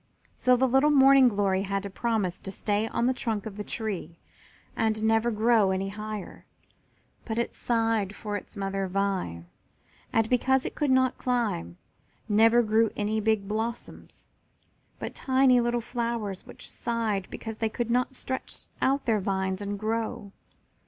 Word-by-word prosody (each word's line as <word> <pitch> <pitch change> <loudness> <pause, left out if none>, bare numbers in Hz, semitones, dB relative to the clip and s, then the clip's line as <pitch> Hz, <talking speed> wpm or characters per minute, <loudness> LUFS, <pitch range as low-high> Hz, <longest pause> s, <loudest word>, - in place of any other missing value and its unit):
So 250 0 +4
the 260 +2 +3
little 270 +4 +4
Morning 270 -2 +7
glory 200 -4 +1
had 195 0 -2
to 200 - -5
promise 205 -5 -1
to 195 - -7
stay 205 +2 -1
on 235 - -1
the 255 - +3
trunk 220 -5 -3
of 215 -3 -6
the 210 - -5
tree 195 -7 -4 0.6
and 220 -1 0
never 225 +1 +3
grow 220 -2 +3
any 190 +1 -1
higher, 210 -1 -7 0.8
but 225 -1 -4
it 235 - -1
sighed 225 -4 0
for 210 0 -5
its 205 - -8
mother 195 0 -2
vine, 185 - -2 0.7
and, 225 -1 +2
because 260 +2 +2
it - - -4
could 295 -2 -1
not 260 -1 +3
climb, 220 - -1 0.5
never 225 +3 +5
grew 220 +1 +3
any 215 +1 -1
big 215 -2 +1
blossoms, 225 +3 -5 0.7
but - - -6
tiny 260 -2 +3
little 240 0 0
flowers 230 -5 -3
which - - -10
sighed 225 -5 -2
because 220 -1 -7
they 225 - +1
could 235 +1 -3
not 250 +2 +1
stretch 260 +1 -5 0.2
out 275 +1 +1
their 225 -3 +2
vines 190 0 -1
and 205 0 -3
grow. 220 -1 -3
220 Hz, 160 wpm, -27 LUFS, 200-240 Hz, 0.8 s, Morning